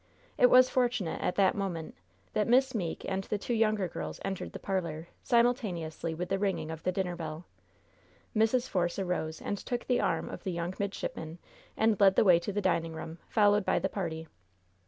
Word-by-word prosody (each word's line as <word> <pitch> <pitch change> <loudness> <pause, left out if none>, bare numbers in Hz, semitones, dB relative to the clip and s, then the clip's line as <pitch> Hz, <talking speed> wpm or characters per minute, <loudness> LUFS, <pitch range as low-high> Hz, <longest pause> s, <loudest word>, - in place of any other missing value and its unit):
It 250 - +6
was 255 +1 +7
fortunate, 240 -10 0
at 180 - 0
that 195 -2 +4
moment, 180 -5 -4 0.4
that 210 -1 +1
Miss 260 +2 +4
Meeke 180 -8 -3
and 195 0 -1
the 210 - -1
two 220 +4 -3
younger 215 -4 +2
girls 80 - -6
entered 195 -1 -4
the - - -5
parlor, 170 -4 -3
simultaneously 200 - 0
with 180 +2 -4
the 195 0 0
ringing 190 -5 -1
of 160 0 -7
the 185 - 0
dinner 180 -1 -2
bell. 160 0 -6 0.9
Mrs. 225 +3 +2
Force 175 -2 0
arose 180 -4 -2
and 205 - -2
took 245 -1 -4
the 250 -1 +2
arm - - 0
of - - -8
the 190 - -2
young 170 +1 -3
midshipman 175 -5 -4 0.4
and 220 -2 +2
led 195 -2 +6
the - - +5
way 180 -4 +6
to 175 - -4
the 205 +1 -1
dining 165 -4 0
room, 160 +1 -7
followed 205 -1 +4
by - - +1
the - - 0
party. 165 -5 -4
190 Hz, 195 wpm, -30 LUFS, 170-215 Hz, 0.9 s, was